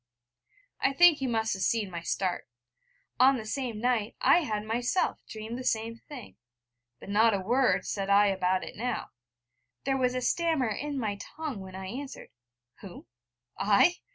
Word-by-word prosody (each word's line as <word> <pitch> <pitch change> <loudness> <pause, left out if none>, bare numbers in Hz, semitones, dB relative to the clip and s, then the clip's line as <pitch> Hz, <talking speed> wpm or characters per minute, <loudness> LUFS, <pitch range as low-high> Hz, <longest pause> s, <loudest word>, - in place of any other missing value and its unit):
I 275 - +1
think 340 +1 +6
he 270 - -1
must 225 -2 0
have 190 - -5
seen 215 -3 0
my 170 -1 -5
start: 180 +1 -2 0.7
on 265 +1 +6
the 220 - -6
same 235 -1 -3
night 235 -2 0
I - - +5
had 215 -10 -2
myself 240 +10 0
dreamed 220 +3 -6
the - - -5
same 230 -1 -1
thing; 255 0 -11 0.6
but - - -12
not 215 +2 +4
a - - -1
word 245 +7 +2
said 195 -1 -3
I 200 +1 +6
about 185 -2 +1
it - - -8
now. 245 +4 -3 0.7
There 270 0 0
was 250 -1 +1
a 255 - -1
stammer 320 -4 +1
in 285 +7 -3
my 210 -5 -2
tongue 305 -5 -6
when 190 -1 -9
I 190 0 -6
answered: 265 +8 -7 0.5
'Who? 190 -4 -11 0.5
I? 210 - +4
225 Hz, 170 wpm, -29 LUFS, 200-265 Hz, 0.7 s, think